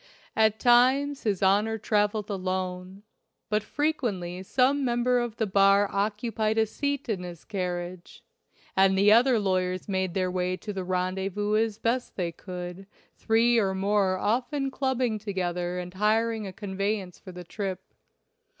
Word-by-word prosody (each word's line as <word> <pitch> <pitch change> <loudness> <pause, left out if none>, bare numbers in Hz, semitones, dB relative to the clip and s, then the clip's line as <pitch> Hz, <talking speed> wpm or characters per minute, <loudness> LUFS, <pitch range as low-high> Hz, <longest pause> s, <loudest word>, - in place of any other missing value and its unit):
At 220 -1 +3
times 260 +4 +3
his 200 -3 0
Honor 210 +4 +3
traveled 210 -1 0
alone, 185 0 -4 0.5
but 210 0 +1
frequently 210 - -2
some 260 +8 +2
member 245 0 +2
of 240 -2 -3
the 225 - 0
bar 195 0 +4
occupied 215 +2 -1
a 220 - +4
seat 285 +5 -3
in 210 -6 -2
his 175 -2 -9
carriage, 180 -3 -5 0.5
and 190 0 +4
the 200 +2 +5
other 240 +2 +5
lawyers 185 -3 -1
made 190 -3 -1
their 185 -1 0
way 180 0 -1
to 210 +1 -6
the 190 -1 -4
rendezvous 190 +3 -1
as 220 -1 +1
best 235 +3 -1
they 175 -3 -2
could, 180 +2 -8 0.3
three 230 +1 +3
or 190 -3 0
more 195 -1 +1
often 250 +7 -1
clubbing 255 -5 -1
together 180 -3 -3
and 180 0 -6
hiring 220 +2 +1
a - - -6
con 200 -3 -7
veyance 195 -2 -2
for 185 - -10
the 180 0 -9
trip. 190 0 -6
205 Hz, 150 wpm, -27 LUFS, 185-225 Hz, 0.5 s, the